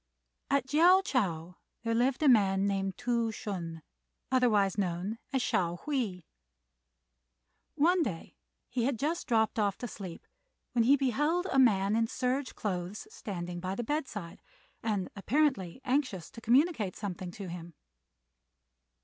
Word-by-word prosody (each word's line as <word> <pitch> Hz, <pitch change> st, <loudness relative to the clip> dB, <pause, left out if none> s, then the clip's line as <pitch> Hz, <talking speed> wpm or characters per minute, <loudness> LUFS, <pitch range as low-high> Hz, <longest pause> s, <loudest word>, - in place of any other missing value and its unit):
At 280 Hz, -2 st, +2 dB
Chiao 345 Hz, +7 st, +6 dB
chou 180 Hz, -, -1 dB, 0.3 s
there 230 Hz, -1 st, 0 dB
lived 250 Hz, +5 st, +1 dB
a -, -, +5 dB
man 200 Hz, -5 st, +4 dB
named 195 Hz, -1 st, -1 dB
Tou 235 Hz, -2 st, 0 dB
Hsün, 170 Hz, -7 st, -5 dB, 0.5 s
otherwise 215 Hz, -7 st, +3 dB
known 195 Hz, +3 st, -2 dB
as 265 Hz, -2 st, +1 dB
Hsiao 175 Hz, -4 st, 0 dB
hui. 240 Hz, -12 st, -2 dB, 1.5 s
One 340 Hz, +4 st, +4 dB
day 195 Hz, -, -4 dB, 0.3 s
he 240 Hz, -2 st, -1 dB
had 265 Hz, -2 st, 0 dB
just 315 Hz, +8 st, -2 dB
dropped 225 Hz, -3 st, +2 dB
off 200 Hz, -2 st, +1 dB
to 245 Hz, -, -5 dB
sleep 190 Hz, -6 st, -8 dB, 0.5 s
when 235 Hz, -2 st, +2 dB
he 275 Hz, +4 st, +7 dB
beheld 295 Hz, +7 st, +1 dB
a 270 Hz, -, +3 dB
man 205 Hz, -5 st, +4 dB
in 225 Hz, 0 st, +2 dB
serge 255 Hz, +3 st, -2 dB
clothes 190 Hz, -, -4 dB
standing 175 Hz, -, -5 dB
by 185 Hz, +2 st, -3 dB
the 240 Hz, -, -3 dB
bedside, 225 Hz, -, -4 dB, 0.4 s
and 205 Hz, -5 st, -1 dB
apparently 250 Hz, -, 0 dB
anxious 255 Hz, -, -1 dB
to 230 Hz, -, -11 dB
communicate 245 Hz, -, +2 dB
something 185 Hz, -3 st, -5 dB
to 200 Hz, -1 st, -7 dB
him. 170 Hz, -2 st, -8 dB
220 Hz, 140 wpm, -31 LUFS, 190-265 Hz, 1.5 s, he